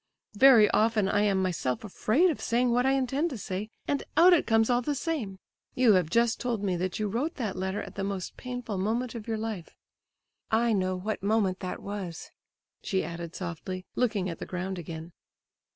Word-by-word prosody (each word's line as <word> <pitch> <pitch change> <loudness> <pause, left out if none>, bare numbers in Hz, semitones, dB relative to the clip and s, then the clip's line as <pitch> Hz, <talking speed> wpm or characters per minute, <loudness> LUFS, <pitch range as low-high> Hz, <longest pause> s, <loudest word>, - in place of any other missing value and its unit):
Very 230 -1 +7
often 215 -2 +2
I 205 +1 +2
am 195 -2 +2
myself 155 - -1
afraid 240 - +2
of - - -6
saying 245 +1 +1
what 245 +2 +2
I 270 - +4
intend 270 +5 0
to 260 - -5
say, 195 +1 -4 0.2
and 285 - 0 0.2
out 355 +3 +8
it 340 - +3
comes 225 -1 +4
all 245 0 +2
the 290 +4 -1
same. 270 - -3 0.4
You 245 -4 +5
have 180 -4 +2
just 235 +4 +2
told 235 -4 -2
me 190 -3 0
that 185 +1 -2
you 215 - -1
wrote 245 +11 -2
that 220 -7 -3
letter 190 +2 -2
at - - -9
the 195 - -4
most 195 -2 -4
painful 245 -5 -5
moment 230 +5 -1
of 230 -2 -7
your 225 -1 -1
life. 215 -6 -5 0.7
I 230 +1 +2
know 185 -2 0
what 210 +4 -3
moment 200 -2 +1
that 185 - -5
was!" 195 -5 -6 0.5
she 190 -1 -1
added 170 0 -6
softly, 185 +1 -5
looking 215 -6 0
at 170 - -5
the - - -6
ground 185 0 -4
again. 165 0 -7
210 Hz, 200 wpm, -28 LUFS, 185-240 Hz, 0.7 s, out